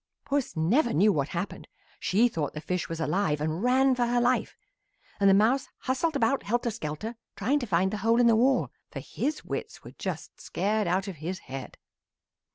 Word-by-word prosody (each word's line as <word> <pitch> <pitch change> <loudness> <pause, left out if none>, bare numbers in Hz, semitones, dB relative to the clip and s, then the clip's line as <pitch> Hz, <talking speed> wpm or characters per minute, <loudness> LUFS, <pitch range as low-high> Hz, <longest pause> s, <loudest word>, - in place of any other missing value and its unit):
"Puss 280 -2 -1
never 225 - +2
knew 205 +6 +4
what 140 -3 0
happened. 175 +4 -5 0.3
She 220 +6 +3
thought 160 -11 -3
the - - -3
fish 180 +3 -2
was 165 0 -4
alive 160 -2 0
and 155 +3 -2
ran 260 +2 +4
for 245 -1 +1
her 240 0 +2
life, 245 +1 +1 0.6
and 200 -1 +5
the - - +6
mouse 230 +7 +3
hustled 285 +5 0
about 275 +1 +2
helter 235 +2 -1
skelter 215 +4 -5 0.2
trying 260 +9 +1
to 245 - -4
find 190 0 +2
the - - -1
hole 225 +3 +2
in 245 - +5
the 230 -1 +6
wall, 250 +3 +2 0.2
for - - -6
his 305 +2 -3
wits - - -5
were - - -10
just - - -5
scared 210 0 -1
out 185 +3 0
of 190 -4 -6
his 170 +5 -4
head. 135 -5 -8
215 Hz, 195 wpm, -28 LUFS, 175-245 Hz, 0.6 s, the